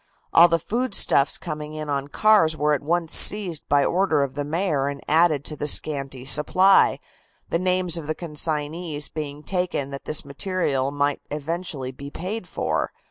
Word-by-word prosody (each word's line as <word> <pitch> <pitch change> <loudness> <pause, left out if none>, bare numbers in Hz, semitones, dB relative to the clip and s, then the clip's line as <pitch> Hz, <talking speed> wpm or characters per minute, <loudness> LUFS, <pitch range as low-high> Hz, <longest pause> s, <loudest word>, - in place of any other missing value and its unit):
All 170 +1 +8
the 165 -1 +2
foodstuffs 200 - +1
coming 150 -2 -6
in 155 -1 -5
on 140 -1 -2
the - - -17
cars 180 -5 +3
were 150 0 +1
at 145 - -1
once 165 +2 0
seized 190 -7 +2
by 140 -1 +3
order 175 -6 +1
of 135 -2 -4
the 145 +1 -3
Mayor 150 -2 -1
and 140 0 -4
added 155 -2 +3
to 155 - -2
the 150 - -4
scanty 135 -3 -1
supply, 185 +8 +4 0.5
the 165 - +1
names 185 -2 +1
of 160 -3 -7
the 155 - -2
consignees 155 -1 -2
being 150 -1 -6
taken 180 -7 -2
that 140 - -8
this 155 -1 +1
material 140 -3 -1
might 145 0 -1
eventually 150 -3 -4
be 140 +2 -10
paid 185 +6 -6
for. - - -2
155 Hz, 175 wpm, -23 LUFS, 145-175 Hz, 0.5 s, All